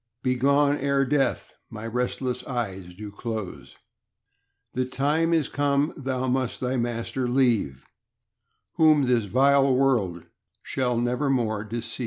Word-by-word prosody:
Begone 140 +3 +2
ere 140 0 +1
death 135 -2 0 0.2
my 115 -1 -8
restless 125 +2 -2
eyes 95 -8 -4
do 105 +1 -8
close; 110 -3 -6 1.0
The 130 0 0
time 145 +6 0
is 160 -4 +2
come 145 +1 0
thou 130 -3 -3
must 130 -1 -1
thy 130 +1 -1
master 120 +1 -2
leave, 115 - +1 0.9
Whom 155 -3 +5
this 125 -4 +2
vile 135 +5 +4
world 115 -11 +1 0.4
shall 125 -3 -1
never 125 +4 0
more 110 -5 0
deceive. 115 +2 -5
125 Hz, 125 wpm, -25 LUFS, 115-135 Hz, 1.0 s, Whom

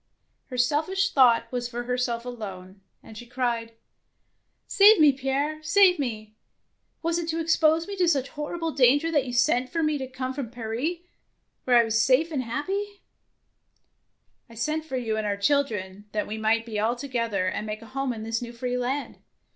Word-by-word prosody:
Her 250 - -7
selfish 315 +10 +1
thought 245 -4 +4
was 245 -1 -3
for 240 0 -5
herself 245 -1 -2
alone, 195 -5 -8 0.2
and 220 - -13
she 240 +2 -10
cried, 235 -2 -2 0.3
— - - -49
" - - -49
Save 410 0 +6
me, 300 -2 +7
Pierre, 280 +3 -2
save 360 +3 +4
me. 215 -5 -4 0.7
Was 335 +1 0
it 335 -1 -4
to 325 0 -1
expose 325 0 +2
me 405 - -5
to 360 -2 +2
such 275 -5 +1
horrible 325 +3 -4
danger 285 +4 +3
that 290 -5 +1
you - - -4
sent 250 +1 +2
for 330 -1 -1
me 305 -1 0
to 265 - -4
come 255 0 -5
from 265 -4 -5
Paris, 240 +7 -3 0.7
where 245 -1 +5
I 235 - +6
was 225 0 +1
safe 265 +7 +3
and 280 -4 -1
happy 390 - -4 0.7
" - - -47
I 230 - -14
sent 305 +7 -2
for 265 -5 -4
you 225 -3 -2
and 215 -1 -2
our 200 -1 -1
children, 205 -6 -1
that 210 -1 -1
we 215 - -5
might 220 +1 0
all 225 +3 +1
be - - -16
together 230 -8 -2
and 210 +3 -3
make 215 +1 -5
a - - -11
home 270 +2 -3
in 220 -2 -6
this 225 +1 -2
new 240 0 -7
free 250 +1 -3
land. 265 +4 -3
255 Hz, 195 wpm, -26 LUFS, 230-305 Hz, 0.7 s, me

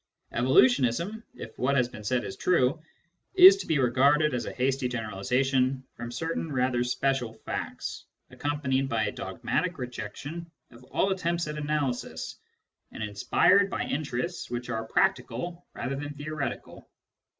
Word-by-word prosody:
Evolutionism, 130 - +3
if 110 - -9
what 140 +3 +2
has 125 -3 +3
been 120 -3 -10
said 120 +3 0
is 130 - -6
true, 155 -3 +2 0.5
is 375 +1 +11
to - - -6
be 160 - +2
regarded 140 +4 +3
as 125 - -2
a - - -3
hasty 130 0 0
generalisation 125 +4 0
from 120 0 -7
certain 160 +3 -3
rather 125 -2 +1
special 125 -2 0
facts, 110 - -5 0.3
accompanied 135 -2 -1
by 110 -3 +1
a - - -1
dogmatic 120 - -2
rejection 130 +7 -6 0.2
of 120 +1 -15
all 195 - 0
attempts 170 -3 -1
at 150 - -4
analysis, 145 -4 -2 0.5
and - - -6
inspired 185 - +3
by - - -2
interests 150 +4 -3
which 120 +1 -4
arc 115 0 -3
practical 180 -2 0
rather 130 +3 -3
than 145 +1 -5
theoretical. 145 0 -5
130 Hz, 140 wpm, -28 LUFS, 120-155 Hz, 0.5 s, is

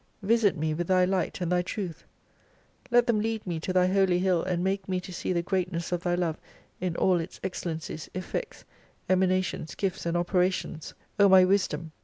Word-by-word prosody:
Visit 210 -3 +3
me 155 +1 -1
with 170 +2 -3
Thy 185 -1 +4
light 185 -1 -1
and 175 0 -1
Thy 180 0 +3
truth; 180 -2 -5 0.8
let 240 0 +5
them 235 -3 +2
lead 225 0 -2
me 170 -3 -3
to 175 - -3
Thy 185 0 +4
Holy 190 -1 +3
Hill 180 -2 +2
and 180 -1 -1
make 195 +1 -1
me 185 -1 0
to 180 0 -9
see 175 - -3
the 170 -1 0
greatness 180 -2 -2
of 175 -1 -1
Thy 175 0 0
love 170 -3 -1 0.4
in 180 -2 -2
all 180 0 +3
its 165 +2 -7
excellen 170 -3 -3
cies, 160 -1 -7
effects, 185 - -5 0.4
emanations, 185 -3 +1
gifts 190 -3 -2
and 170 +1 0
operations; 180 -3 -1 0.2
O 200 -1 +7
my 185 -1 +8
Wisdom 175 -5 0
180 Hz, 195 wpm, -27 LUFS, 175-190 Hz, 0.8 s, my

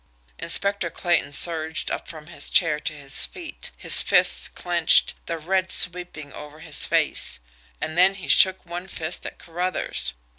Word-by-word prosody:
Inspector 200 -3 +3
Clayton 170 -5 -1
surged 160 0 0
up - - -5
from 155 -2 -10
his 150 -3 -5
chair 165 -4 +2
to 155 - -3
his 140 -2 -1
feet, 340 -3 -7
his - - +3
fists - - +3
clenched, 175 -2 +2
the 165 - -3
red 185 +4 -2
sweeping 175 -5 0
over 150 0 -11
his 155 -2 0
face - - 0 0.4
and 155 - -4
then 185 +3 +4
he 190 - -9
shook 190 0 +4
one 175 +2 -7
fist 165 -2 -5
at - - -11
Carruthers. 175 - -3
170 Hz, 155 wpm, -23 LUFS, 155-180 Hz, 0.4 s, then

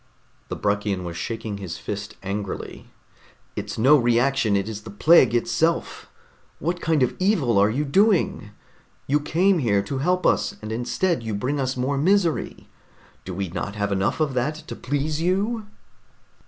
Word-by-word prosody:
The - - -4
Bruckian 100 -2 -1
was 85 -1 -6
shaking 110 +2 -4
his 95 -4 -6
fist 105 0 -6
angrily. 100 0 -5 0.7
"It's - - -5
no 135 +7 +6
reaction, 120 -2 +2
it 100 +1 0
is 110 -2 -5
the - - -10
plague 125 +2 +5
itself! 165 +7 0 0.5
What 175 +4 -2
kind 155 -4 +2
of 125 - 0
evil 160 - +2
are 100 +1 +4
you 140 +7 -1
doing? 190 - +2 0.6
You 145 +2 +2
came 175 +5 +2
here 100 -7 +2
to 135 +6 -4
help 180 +6 +1
us, - - +2
and 110 0 -7
instead 125 +8 0
you 110 -2 -3
bring 135 +8 -1
us 130 -1 -1
more 135 +2 0
misery. 175 0 +1 0.6
Do 95 - -5
we 95 -1 -3
not 95 +4 -4
have 100 -1 -1
enough 100 +8 0
of 150 -4 +1
that 130 +5 0
to - - -5
please 145 +3 -2
you?" 205 +5 0
130 Hz, 165 wpm, -23 LUFS, 105-160 Hz, 0.7 s, no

